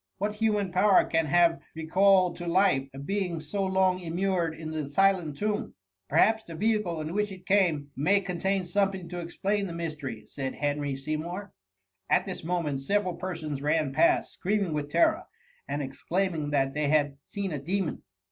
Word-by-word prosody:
What 205 +2 -1
human 210 -3 +1
power 190 +2 +5
can 165 -1 +1
have 170 +2 +4 0.2
recalled 185 +3 +3
to 175 - -6
life, 170 -7 +3
a 135 - -11
being 180 +3 -2
so 160 +6 -3
long 190 -1 +2
immured 175 -1 -1
in 160 -1 -6
the 155 -3 -3
silent 180 -2 +2
tomb 210 0 -2 0.2
!'' 95 0 -54
Perhaps 220 +8 +3
the 165 - -8
vehicle 210 -4 0
in 155 +2 -4
which 210 0 0
it 185 -1 -11
came 170 -8 +2
may 180 +9 +3
contain 190 0 -1
something 190 -1 0
to 180 - -5
explain 195 +4 -1
the 170 - -6
mystery,'* 155 -8 -5
said 135 -1 -5
Henry 145 -1 -1
Seymour. 160 +8 -4 0.6
At - - +3
this 190 -3 -6
moment 160 -5 -1
several 200 +4 0
persons 160 -6 -5
ran 150 -1 +1
past, 155 - +3
screaming 195 -3 -1
with 145 -1 -2
terror, 325 - +3 0.4
and 145 0 -2
exclaiming 165 +3 -2
that 135 -2 +1
they 150 -1 0
had 145 -2 +2
seen 200 -2 -4
a 150 - -3
demon. 180 +3 -2
175 Hz, 175 wpm, -28 LUFS, 150-195 Hz, 0.6 s, power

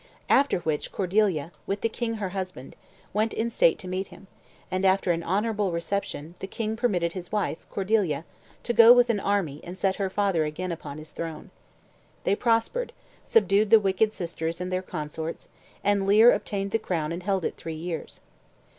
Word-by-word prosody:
After 275 -10 +4
which 155 -3 -2
Cordeilla, 185 -5 +1 0.2
with 200 +1 -2
the - - +2
king 230 0 -3
her 205 -4 -3
husband, 185 -8 -6 0.4
went 215 +2 0
in 230 +1 -1
state 170 -7 +4
to 185 - -8
meet 185 +1 -3
him, - - -14 0.5
and, 185 +1 -1
after 190 -1 +3
an 170 0 0
honorable 205 +2 0
reception, 170 -2 -3
the 190 - -5
king 220 +2 -3
permitted 180 -8 0
his 180 -2 -7
wife, 205 -6 -1
Cordeilla, 190 -7 0 0.4
to 240 - -1
go 230 +1 +9
with 245 -1 +5
an 210 - -1
army 190 -8 -1
and 180 +1 -8
set 190 0 0
her 195 -2 -1
father 195 -4 +1
again 170 +4 -3
upon 155 -3 -6
his 155 0 -10
throne. 165 -1 -6 0.7
They 195 - +2
prospered, 230 - 0 0.3
subdued 215 - +3
the 225 - +8
wicked 200 +2 +2
sisters 165 -3 -4
and 180 0 -4
their 185 - 0
consorts, 160 -1 -6 0.3
and 200 -1 +2
Leir 220 +4 +7
obtained 195 -1 -2
the 225 - +1
crown 165 -7 -2
and 170 +2 -4
held 190 -1 0
it - - -2
three 165 -1 -6
years. 165 +1 -6
190 Hz, 180 wpm, -26 LUFS, 170-210 Hz, 0.7 s, go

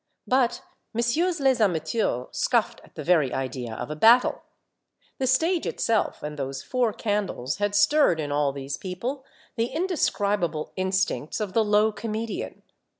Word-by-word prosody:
But 255 -2 +1 0.3
Messieurs 320 +10 +1
les 265 -3 +2
amateurs 160 - 0
scoffed - - 0
at - - -20
the - - -6
very 160 -7 +3
idea 125 -3 -4
of 125 +6 -5
a - - -3
battle. 230 +10 +5 0.8
The 260 - 0
stage 325 +7 +2
itself 225 -2 0
and 150 0 -5
those 135 0 -4
four 245 -3 0
candles 205 - -2
had 205 0 -1
stirred 205 - +4
in 145 -2 -3
all 145 -1 +1
these 140 0 -5
people 235 +9 -5 0.3
the 230 +1 +1
indescribable 205 - -1
instincts 185 -4 -1
of 205 -3 -3
the 225 - +3
low 210 +1 +3
comedian. 220 +1 -5
205 Hz, 150 wpm, -25 LUFS, 150-240 Hz, 0.8 s, battle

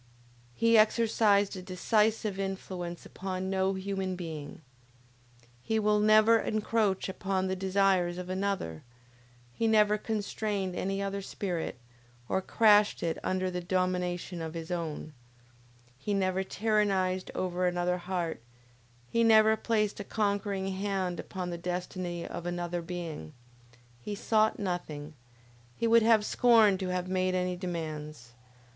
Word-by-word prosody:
He 230 - +5
exercised 215 -2 +3
a 185 - -6
decisive 210 +2 0
influence 185 -3 -5
upon 190 0 -4
no 190 0 +1
human 190 -1 -3
being. 160 -4 -7 1.0
His 220 - 0
will 210 0 +3
never 215 +2 +6
encroached 215 -3 0
upon 190 0 -2
the 190 0 -1
desires 190 -2 +2
of 180 0 -6
another, 185 - -2 0.7
he 225 - 0
never 210 -1 +4
constrained 205 -3 -2
any 195 +2 -2
other 200 0 -3
spirit, 180 -7 -4 0.5
or 190 - 0
crashed 210 0 +4
it 165 -1 -1
under 185 0 -1
the 180 0 -3
domination 180 -1 -1
of 160 0 -5
his 165 +1 -6
own, 160 -3 -4 0.9
He 205 +8 -1
never 190 -1 +1
tyrannized 195 -3 0
over 180 0 0
another 180 0 0
heart, 175 -5 -3 0.7
he 230 - +1
never 220 -1 +6
placed 215 -2 0
a - - -3
conquering 200 -2 -1
hand 190 -2 -2
upon 180 -2 -5
the 170 - -5
destiny 180 0 -4
of 170 - -6
another 175 0 -3
being. 165 - -6 0.7
He 205 +10 -4
sought 215 +1 +2
nothing; 160 -6 -4 0.6
he - - -1
would 230 0 +6
have 220 -1 +4
scorned 220 -6 +5
to 190 - -2
have 180 0 -2
made 185 0 0
any 180 0 0
demands. 155 -8 -6
190 Hz, 130 wpm, -30 LUFS, 180-210 Hz, 1.0 s, never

